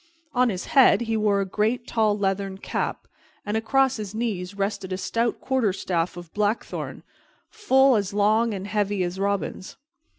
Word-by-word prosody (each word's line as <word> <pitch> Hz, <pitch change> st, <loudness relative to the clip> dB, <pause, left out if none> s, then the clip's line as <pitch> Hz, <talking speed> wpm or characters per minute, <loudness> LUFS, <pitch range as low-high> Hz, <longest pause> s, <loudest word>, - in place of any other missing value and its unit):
On 250 Hz, -1 st, +3 dB
his 185 Hz, -4 st, -4 dB
head 265 Hz, -4 st, +6 dB
he 225 Hz, -1 st, -1 dB
wore 210 Hz, -2 st, +2 dB
a -, -, -1 dB
great 220 Hz, +5 st, -1 dB
tall 215 Hz, -3 st, +1 dB
leathern 195 Hz, -1 st, -1 dB
cap, -, -, -3 dB, 0.4 s
and 205 Hz, +1 st, -2 dB
across 265 Hz, +4 st, +2 dB
his 210 Hz, -1 st, -6 dB
knees 200 Hz, -5 st, -3 dB
rested 195 Hz, -1 st, -2 dB
a 185 Hz, -, -1 dB
stout 230 Hz, +4 st, -1 dB
quarterstaff 190 Hz, -9 st, -1 dB
of 175 Hz, -2 st, -10 dB
blackthorn, 210 Hz, +2 st, -2 dB, 0.5 s
full 270 Hz, -, +4 dB
as 200 Hz, -3 st, 0 dB
long 215 Hz, +3 st, +2 dB
and 195 Hz, -2 st, -5 dB
heavy 205 Hz, -2 st, 0 dB
as 180 Hz, +1 st, -4 dB
Robin's. 200 Hz, -1 st, -2 dB
210 Hz, 160 wpm, -24 LUFS, 195-230 Hz, 0.5 s, head